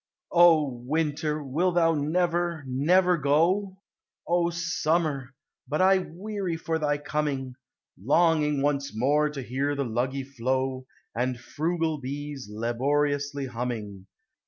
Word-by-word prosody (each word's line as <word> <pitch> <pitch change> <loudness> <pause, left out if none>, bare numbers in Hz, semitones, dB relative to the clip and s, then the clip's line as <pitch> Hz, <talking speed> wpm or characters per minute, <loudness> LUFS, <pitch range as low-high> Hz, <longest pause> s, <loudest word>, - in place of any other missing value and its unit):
O 170 -3 +6 0.2
winter! 150 +1 -1
wilt 170 +7 0
thou 165 -1 +4
never, 170 +1 0
never 175 +8 +3
go? 175 +7 +2 0.5
O 170 0 +2
summer! 165 -5 -1 0.3
but 150 - -1
I 190 +1 +5
weary 185 0 -4
for 160 0 -2
thy 145 -1 +1
coming, 145 -3 -2 0.5
Longing 150 0 +3
once 140 -5 -1
more 145 +5 +2
to 140 -3 -6
hear 135 +4 -1
the 140 -1 -1
Luggie 130 +4 -2
flow, 130 0 -2 0.3
And 125 +1 -1
frugal 160 +4 -2
bees, 140 -2 -6
laboriously 140 +5 -1
humming. 115 -6 -5
145 Hz, 115 wpm, -27 LUFS, 130-165 Hz, 0.5 s, O